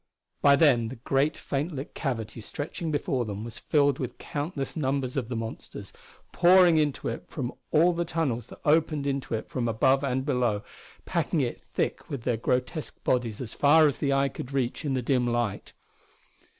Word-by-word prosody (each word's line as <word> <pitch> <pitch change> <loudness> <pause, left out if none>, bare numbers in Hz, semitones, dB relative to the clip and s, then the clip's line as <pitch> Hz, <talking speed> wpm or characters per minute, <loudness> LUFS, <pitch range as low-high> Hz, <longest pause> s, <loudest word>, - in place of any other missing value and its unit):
By 140 -1 +7
then 135 -6 +4
the 125 - -6
great, 135 +5 0
faint 145 +5 -3
lit 135 +1 -6
cavity 115 -5 -3
stretching 150 +8 -5
before 140 -4 0
them 105 -1 -5
was 115 0 -7
filled 145 -3 +2
with 125 -2 -4
countless 145 -1 -4
numbers 135 -4 -1
of 125 -5 -2
the 125 - -3
monsters, 115 0 -6 0.4
pouring 175 -1 +6
into 150 -3 0
it - - -4
from 130 -3 -4 0.2
all 170 +3 +4
the 170 0 -1
tunnels 140 -9 -2
that - - -13
opened 155 -1 +2
into 140 -4 -1
it 110 - -5
from 125 -2 -2
above 130 +5 +3
and 130 -1 -1
below, 120 -7 0 0.4
packing - - 0
it - - -3
thick - - -3
with 135 -5 -5
their 120 -2 0
grotesque 125 +7 -2
bodies 120 -4 0
as 115 -4 -5
far 155 +2 +5
as 140 -5 -2
the 140 - +1
eye 135 0 +2
could 130 - -8
reach 130 +2 -1
in 140 -3 -1
the 125 - -1
dim 125 0 +1
light. 120 -4 -1
135 Hz, 185 wpm, -27 LUFS, 120-145 Hz, 0.4 s, By